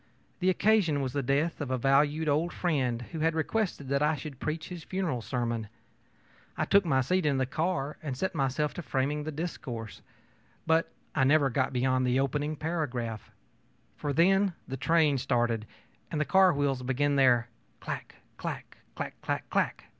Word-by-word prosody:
The 185 0 +2
occasion 185 -6 +3
was 130 -2 -2
the 140 - 0
death 145 +6 0
of 140 - -3
a 130 - 0
valued 145 +5 +2
old 155 +4 +1
friend 130 -9 0
who 165 - -5
had 160 +1 +1
requested 170 -3 -1
that 140 +1 +1
I 150 +1 +3
should 140 -1 -8
preach 155 +1 -3
his 175 -3 -7
funeral 180 -10 -2
sermon. 115 -2 -2 0.9
I - - +1
took 200 -1 +4
my 135 -5 +3
seat 180 +8 +1
in 145 -3 +2
the 130 - +1
cars 150 +1 -2
and 140 -5 -4
set 190 +6 -1
myself 145 0 0
to - - -5
framing 145 0 -1
the 155 - -3
discourse. 135 -8 -5 0.6
But 160 +1 +2 0.2
I 140 - +2
never 140 0 +4
got 130 +2 +1
beyond 130 0 +1
the 125 +1 +2
opening 145 +3 0
paragraph; 130 - -3 0.7
for 145 - -3
then 190 +5 +3
the 135 - -4
train 150 0 +3
started 120 -4 0 0.4
and 155 - -2
the 150 - +1
car 190 +1 +5
wheels 140 -4 0
began 135 +3 +1
their 125 -3 +4 0.3
'clack, - - -6 0.2
clack - - -6 0.2
clack - - -6
clack - - -2
clack! - - 0
145 Hz, 175 wpm, -29 LUFS, 130-160 Hz, 0.9 s, car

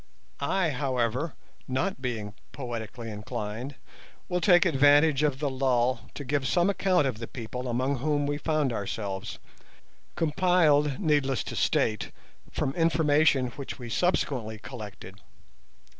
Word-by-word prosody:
I, 165 +3 +1
however, 130 +1 -1 0.3
not 135 +5 -1
being 110 -5 -3 0.2
poetically 115 -3 -6
inclined, 105 +5 -5 0.5
will 180 0 0
take 180 -1 +6
advantage 145 -1 +5
of 145 -3 +1
the 145 +1 -1
lull 130 -2 0
to 145 - -5
give 135 0 0
some 180 +2 +3
account 185 -5 +2
of 125 -5 -2
the 115 - -5
people 125 +1 -6
among 130 +3 0
whom 145 +2 0
we 145 0 -2
found 150 -5 0
ourselves, 100 -2 -4 0.8
compiled, 155 -3 +3
needless 145 - +1
to - - -6
state, 110 -1 +1 0.4
from 135 - -1
information 155 -5 +3
which 135 +3 -7
we 120 -3 -8
subsequently 125 -11 0
collected. 105 -3 -9
135 Hz, 130 wpm, -28 LUFS, 120-150 Hz, 0.8 s, take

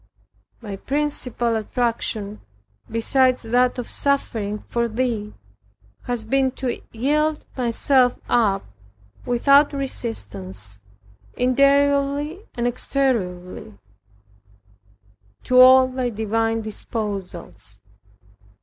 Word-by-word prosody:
My 205 -4 -6
principal 255 -3 -1
attraction, 220 -2 -2 0.5
besides 255 +3 +2
that 245 +3 +2
of 245 - -6
suffering 220 -7 -1
for 235 0 0
Thee, 225 -2 -2 0.7
has 240 -3 -3
been 265 +3 +2
to 255 -3 -3
yield 300 +6 0
myself 250 +1 +2
up 205 -5 +2 0.6
without 275 +5 +4
resistance, 100 - -4 0.6
interiorly 280 - +2
and 240 - -2
exteriorly, 195 - -2 1.7
to 255 0 +3
all 260 0 +8
Thy 255 -1 -2
divine 225 +1 -1
disposals. 200 - -6
240 Hz, 80 wpm, -22 LUFS, 215-265 Hz, 1.7 s, all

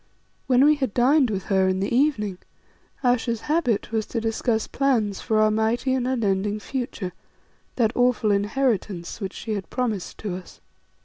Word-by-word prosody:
When 260 +1 +5
we 300 - +6
had 265 -7 -2
dined 260 +2 +4
with 195 -3 -2
her 190 -1 +2
in 185 0 +1
the 200 +4 -1
evening, 215 -9 +1 0.6
Ayesha's 240 -2 +1
habit 295 -10 0
was 220 -1 -1
to 235 - -2
discuss 225 0 0
plans 230 -8 0
for 220 -1 +1
our 215 0 +4
mighty 225 +4 +1
and 255 -1 0
unending 210 -4 0
future, 225 -6 -4 0.6
that 230 -2 +1
awful 245 -4 +2
inheritance 205 -3 -1
which 195 -1 -4
she 220 - -4
had 200 -2 -5
promised 225 -7 -3
to 200 -4 -4
us. 185 - -13
225 Hz, 165 wpm, -24 LUFS, 205-250 Hz, 0.6 s, we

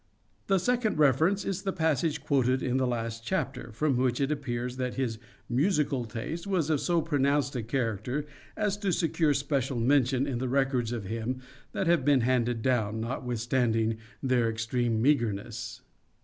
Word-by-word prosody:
The 195 - +4
second 235 +1 +1
reference 155 - +3
is 195 -1 -2
the 195 -1 -1
passage 160 -3 0
quoted 130 -3 +2
in 130 0 +1
the 130 -1 +1
last 115 -1 -3
chapter, 135 -8 -2
from 135 +3 +1
which 125 -1 +1
it 140 +1 +1
appears 125 -4 -3
that 125 -1 -2
his 120 -5 -2 0.3
musical 140 -2 +1
taste 150 - -5
was 170 -6 +1
of 150 - +1
so 170 -2 +1
pronounced 140 -3 +1
a 120 - -1
character 120 +3 -2 0.3
as 210 -2 0
to 200 -2 -1
secure 160 -3 +2
special 140 -3 -1
mention 130 +1 +3
in 130 -4 -2
the 130 0 -2
records 130 -3 +1
of 115 -3 -3
him 115 +5 -3 0.3
that 190 - -1
have 170 -4 +3
been 140 -2 +4
handed 120 -2 +1
down, 110 -4 +1
notwithstanding 115 -1 0 0.2
their 125 -3 +2
extreme 115 0 0
meagreness. 115 -2 0
130 Hz, 165 wpm, -29 LUFS, 120-150 Hz, 0.3 s, The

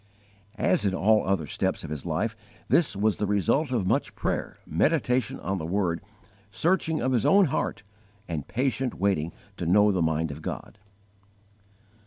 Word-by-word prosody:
As 185 - +2
in 95 -2 +1
all 110 +3 +3
other 95 -5 +1
steps - - -2
of - - -7
his 75 +1 -5
life, 105 +8 -1 0.3
this 165 -10 +4
was 105 +1 +1
the 105 - -1
result 115 - +1
of 115 -7 0
much - - 0
prayer, - - -2
meditation 125 - +1
on 95 -1 -2
the 80 - -4
Word, 90 -2 0 0.5
searching 160 - +1
of 130 +2 0
his 120 -4 +2
own 200 0 +5
heart, 140 -5 -2 0.4
and 80 -5 -4
patient 130 0 -1
waiting 95 -5 0 0.3
to 85 - -3
know 105 +4 +5
the 95 -3 0
mind 80 -1 0
of 75 +2 -8
God. 100 - -6
100 Hz, 165 wpm, -27 LUFS, 85-125 Hz, 0.5 s, own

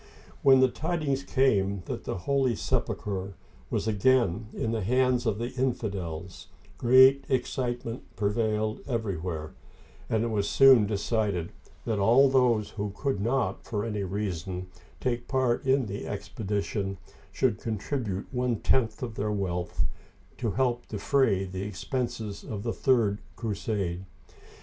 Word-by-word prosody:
When 135 -1 +6
the 130 - +7
tidings 145 0 -1
came 100 -9 +1
that - - -5
the - - -3
Holy 135 -4 +2
Sepulcher 100 -1 -2 0.3
was 105 0 -1
again 110 -2 +2
in 115 - -2
the 115 -1 -1
hands 125 +3 +2
of 105 -2 +1
the 120 +2 -3
infidels, 100 -9 -3 0.3
great 130 +3 +7
excitement 125 -2 -2
pre 100 -1 +1
vailed 110 0 0
everywhere, 90 - -3 0.6
and 110 0 +1
it 115 - 0
was 105 -2 0
soon 130 -6 +7
decided 100 -4 -1 0.3
that 110 -3 0
all 120 +7 +6
those 125 -5 +3
who 105 -1 -3
could 135 -4 -1
not, 120 +2 0
for 105 -1 -3
any 105 -3 -2
reason, 95 -2 -3 0.3
take 120 -2 -2
part 130 -3 +1
in 135 -1 +3
the 100 -1 -5
expedition, 100 -1 -3 0.3
should 120 -5 +1
contribute 110 -2 -3
one 125 -2 0
tenth 110 +1 +1
of 120 -3 -4
their 105 0 -2
wealth 90 -4 -1 0.6
to 115 - 0
help 120 +1 0
defray 105 -2 +1
the 95 0 -5
expenses 105 0 -4
of 105 -2 -5
the 115 -1 -1
third 115 -6 +2 0.2
crusade. 100 -5 -2
110 Hz, 135 wpm, -28 LUFS, 100-125 Hz, 0.6 s, the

